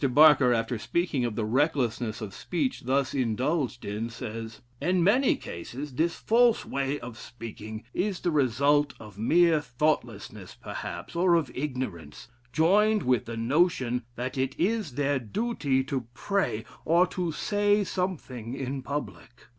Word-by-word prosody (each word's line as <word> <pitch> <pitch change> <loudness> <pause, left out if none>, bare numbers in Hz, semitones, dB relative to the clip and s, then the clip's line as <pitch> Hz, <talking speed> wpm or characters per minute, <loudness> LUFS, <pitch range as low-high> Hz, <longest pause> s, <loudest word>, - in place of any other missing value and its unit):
Barker, 140 -1 +6
after 115 0 0
speaking 155 -1 0
of 115 -3 -3
the 110 - -1
recklessness 120 -3 0
of 105 -3 -6
speech 150 -9 -2
thus 135 +1 +1
indulged 130 +2 -1
in, 105 +3 -3
says: 115 -1 -7 0.2
"In 180 +3 +2
many 245 +9 +4
cases 130 - -7
this 165 +6 +1
false 235 0 +3
way 140 +1 -2
of 115 -2 -9
speaking 110 -2 -8
is 190 0 -1
the 175 - 0
result 145 +1 +2
of 105 -3 -12
mere 165 +6 +4
thoughtlessness 120 -8 -2
perhaps, 85 - -7
or 175 0 +4
of 155 -7 0
ignorance, 125 - -5 0.2
joined 205 +7 +3
with 125 -3 +2
the 115 0 -6
notion 125 -1 +1
that 130 +2 -4
it 130 +1 -1
is 205 - 0
their 140 +1 +1
duty 140 - -1
to 130 -3 -3
pray, 195 - -1 0.2
or 170 +3 +4
to 180 -2 -3
say 205 +4 +2
something 140 - -3
in 135 0 -3
public. 140 -4 -6
135 Hz, 145 wpm, -28 LUFS, 120-170 Hz, 0.2 s, Barker